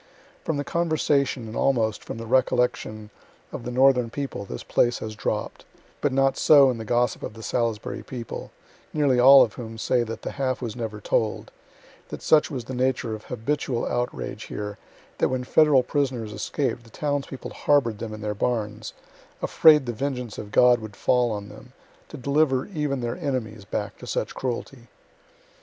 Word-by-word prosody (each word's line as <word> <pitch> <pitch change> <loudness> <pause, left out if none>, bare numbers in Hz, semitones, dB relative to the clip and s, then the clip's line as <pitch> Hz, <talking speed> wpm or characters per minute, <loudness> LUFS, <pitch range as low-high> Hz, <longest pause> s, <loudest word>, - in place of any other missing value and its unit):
From 160 - -1
the 145 - -1
conversation 150 -6 0
and 110 - -8
almost 115 -5 +1
from - - -7
the 115 - -6
recollection 115 -3 0 0.4
of - - -7
the - - -3
northern 125 -1 +4
people 135 -5 -5
this 60 - -7
place 120 0 +2
has 110 0 -6
dropp' - - -3
d, - - -19 0.4
but 145 - +1
not 135 0 +2
so 140 -3 +7
in 120 - -5
the 110 - -6
gossip 120 +1 +1
of 105 - -6
the 110 - -10
Salisbury 115 -2 -2
people, 120 -3 -7 0.5
nearly 140 -5 +3
all 135 +2 +9
of 110 - -2
whom 115 -2 -8
say 120 +2 +1
that 115 -1 -5
the - - -3
half 130 -3 -1
was 115 -4 -5
never 110 -3 -5
told; 105 +1 -1 0.6
that - - -7
such 155 -1 +4
was 130 -5 -5
the 130 - -6
nature 125 -2 0
of 110 - -8
habitual 130 0 -2
outrage 120 - -3
here 105 0 -6 0.4
that - - +3
when 130 -1 -1
Federal 140 0 +4
prisoners 125 -5 -2
escaped 120 +3 -2
the 115 - -17
townspeople 145 +1 -3
harbor'd 120 -8 +1
them 115 - -5
in 110 0 -7
their 105 0 -2
barns, 110 0 -2 0.5
afraid 150 -3 +5
the 120 - -3
vengeance 125 -2 -4
of 105 -1 -8
God 125 +2 +5
would 110 -2 -9
fall 125 -1 +2
on 105 -2 -4
them, 125 +4 -14 0.4
to 155 - -8
deliver 140 0 +1
even 150 -8 -2
their 120 +4 -3
enemies 115 - -3
back - - -4
to - - -10
such - - -2
cruelty. 125 -1 -5
125 Hz, 180 wpm, -25 LUFS, 110-135 Hz, 0.6 s, all